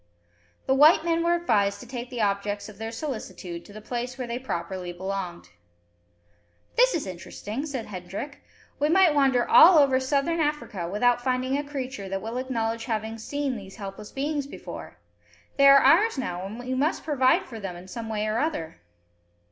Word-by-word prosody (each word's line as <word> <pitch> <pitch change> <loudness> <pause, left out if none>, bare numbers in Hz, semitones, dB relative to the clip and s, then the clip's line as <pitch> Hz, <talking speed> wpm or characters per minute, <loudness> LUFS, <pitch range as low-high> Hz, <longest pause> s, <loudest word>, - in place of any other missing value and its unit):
The 265 - +2
white 305 +4 +6
men 335 0 +1
were 340 0 +3
advised 205 -12 +1
to - - -10
take 245 -1 -6
the 245 -3 -4
objects 205 0 -1
of 210 -2 -13
their 225 0 -4
solicitude 215 - -6
to - - -14
the 215 0 -10
place 245 +2 -4
where 255 - -3
they 240 +1 -4
properly 180 -6 -4
belonged. 180 - -5 1.3
"This - - +4
is 320 - -2
interesting," 205 - -6
said 260 -6 -4
Hendrik. 195 +9 -7 0.4
"We 295 +1 +2
might 360 -2 +5
wander 270 -4 +3
over - - -7
all 290 -6 +7
Southern 285 +5 0
Africa 295 - -2
without 245 +5 +2
finding 255 +1 0
a 290 - -1
creature 265 -8 -5
that 195 0 -3
will 225 +2 -4
acknowledge 230 -3 -2
having 220 -1 -3
seen 285 +3 -2
these 195 -3 -9
helpless 200 0 -8
beings 285 0 -2
before. - - -9 0.6
They 275 0 +7
are 275 0 +9
ours 380 +8 +5
now, 185 -7 -3
and 215 +3 -8
we 250 +1 -4
must 285 +5 0
provide 265 -4 +2
for 230 -3 -9
them 195 -4 -5
in 175 +1 -11
some 225 +3 -6
way 215 -1 -1
or 215 +2 0
other." 165 - -3
245 Hz, 180 wpm, -26 LUFS, 200-280 Hz, 1.3 s, are